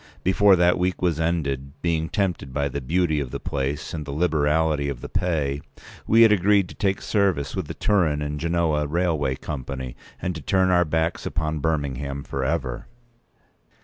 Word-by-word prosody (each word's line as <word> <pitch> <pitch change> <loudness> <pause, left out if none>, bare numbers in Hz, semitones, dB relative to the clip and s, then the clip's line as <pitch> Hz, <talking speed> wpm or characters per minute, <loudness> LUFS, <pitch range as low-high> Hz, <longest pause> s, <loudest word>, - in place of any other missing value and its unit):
Before 95 +1 +5
that 90 0 +3
week 90 0 0
was 85 -3 +1
ended, 70 -5 -1
being 80 -1 0
tempted 90 -9 -1
by 70 +1 -1
the 70 +2 -4
beauty 80 +3 +1
of 70 -3 -3
the 70 +2 -5
place 70 -3 -3
and 80 -2 -4
the 70 - -10
liberality 75 -1 +1
of 65 -4 -5
the - - -7
pay, 75 -6 -1 0.5
we 115 +1 +6
had 110 - +6
agreed 100 -1 +4
to - - -9
take 95 -2 -1
service 95 -10 +1
with 95 -5 -3
the - - -6
Turin 85 -8 +2
and 75 0 -3
Genoa 80 -2 +1
Railway 80 -4 0
Company, 65 -2 -6 0.2
and 90 - -2
to 80 - -7
turn 95 +4 +2
our 90 -1 +4
backs 80 +1 -1
upon 80 -1 -2
Birmingham 70 -2 -2
for 70 - -3
ever. 65 -4 -2
80 Hz, 180 wpm, -24 LUFS, 70-90 Hz, 0.5 s, we